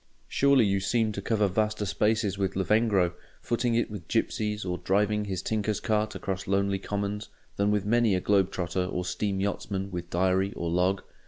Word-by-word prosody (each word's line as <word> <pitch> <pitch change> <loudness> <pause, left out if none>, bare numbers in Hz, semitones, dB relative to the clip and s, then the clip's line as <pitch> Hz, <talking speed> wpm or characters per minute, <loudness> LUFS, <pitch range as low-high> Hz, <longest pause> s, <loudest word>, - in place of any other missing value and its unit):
Surely 140 -4 +4
you 100 -1 +1
seem 110 +3 +1
to 100 - -5
cover 105 0 +1
vaster 105 +2 0
spaces 105 -1 +1
with 95 -1 -1
Lavengro, 95 -2 +2 0.3
footing 120 0 0
it 120 -2 0
with 100 -5 -7
gipsies 105 -1 -1
or 90 -1 -2
driving 105 +2 +1
his 95 -2 -3
tinker's 105 -1 -1
cart 110 0 0
across 95 -2 -4
lonely 100 0 +1
commons, 100 +1 -3 0.3
than 100 +1 +1
with 105 -1 +1
many 115 -2 +3
a - - +1
globe 100 0 +2
trotter 90 -1 -2
or 90 -1 -3
steam 100 +1 -1
yachtsman 100 0 -2
with 85 -1 -5
diary 95 +2 +1
or 85 -1 -3
log? 90 +2 +1
100 Hz, 180 wpm, -28 LUFS, 95-105 Hz, 0.3 s, Surely